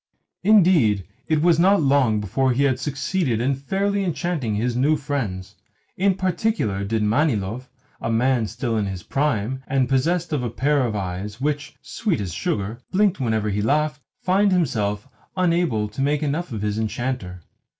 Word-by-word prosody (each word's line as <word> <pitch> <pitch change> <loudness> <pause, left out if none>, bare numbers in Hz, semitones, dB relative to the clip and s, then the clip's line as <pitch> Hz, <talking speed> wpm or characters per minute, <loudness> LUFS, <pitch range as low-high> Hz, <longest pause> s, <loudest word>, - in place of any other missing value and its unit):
Indeed, 175 - +4 0.2
it 155 -1 +1
was 170 -2 +4
not 195 +3 +5
long 135 -7 +3
before 130 +6 0
he 135 +3 +1
had 130 -2 +2
succeeded 140 - -1
in 130 +4 +1
fairly 195 +9 -1
enchanting 165 - -2
his 120 +3 -1
new 145 +5 +3
friends. 120 -11 -4 0.4
In 195 0 +2
particular 185 - -1
did 110 +2 -1
Manilov 115 -1 0 0.3
a - - -2
man 120 0 +2
still 115 +1 -3
in 105 -2 0
his 95 -3 -5
prime, 130 -3 -1
and 135 -2 +1
possessed 160 +6 0
of 145 - 0
a 120 - -2
pair 135 +3 +1
of 110 - -3
eyes 100 +2 -4
which, 145 +1 -2
sweet 210 - -2
as 95 -4 -4
sugar, 105 +5 -2
blinked 195 -2 +2
whenever 110 -4 0
he 105 +1 -1
laughed 150 +5 0 0.2
find 195 +2 +3
himself 110 - 0 0.3
unable 170 -12 +1
to 110 +6 -5
make 145 +2 +1
enough 150 +3 -2
of 105 -3 -4
his 105 +1 -1
enchanter. 110 -5 -3
130 Hz, 165 wpm, -23 LUFS, 110-160 Hz, 0.4 s, not